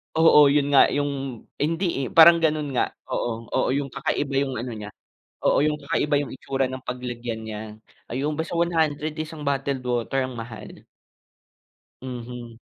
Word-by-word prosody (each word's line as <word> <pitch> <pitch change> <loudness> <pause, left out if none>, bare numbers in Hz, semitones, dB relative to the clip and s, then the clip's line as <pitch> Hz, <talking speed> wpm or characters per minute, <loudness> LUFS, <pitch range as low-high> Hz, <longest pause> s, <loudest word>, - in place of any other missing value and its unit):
Oo 160 -2 +7
'yon 145 0 +3
nga 140 -1 +7
yung 140 -4 -2 0.2
hindi 165 -2 0
eh, - - -3
parang 170 +1 +9
gano'n 155 -3 0
nga. - - +4 0.2
Oo, 115 -1 -3
oo - - +1
yung 140 0 -1
kakaiba 135 +1 -2
'yong 135 -1 0
ano 125 - -5
niya. 105 0 -7 0.6
Oo - - +4
'yong 150 0 +1
kakaiba 145 +1 0
'yong 145 - -5
itsura 135 +1 -1
ng 130 0 -7
paglagyan 120 -2 -5
niya. 110 -1 -5 0.5
Ayun, 145 +4 -1
basta 160 +1 -3
100 160 -3 0
isang 155 0 -6
bottled 135 -1 -1
water, 125 +2 0
ang 130 -2 -8
mahal. 115 -1 -9 1.2
Mhm. 120 -2 -7
135 Hz, 155 wpm, -24 LUFS, 125-150 Hz, 1.2 s, parang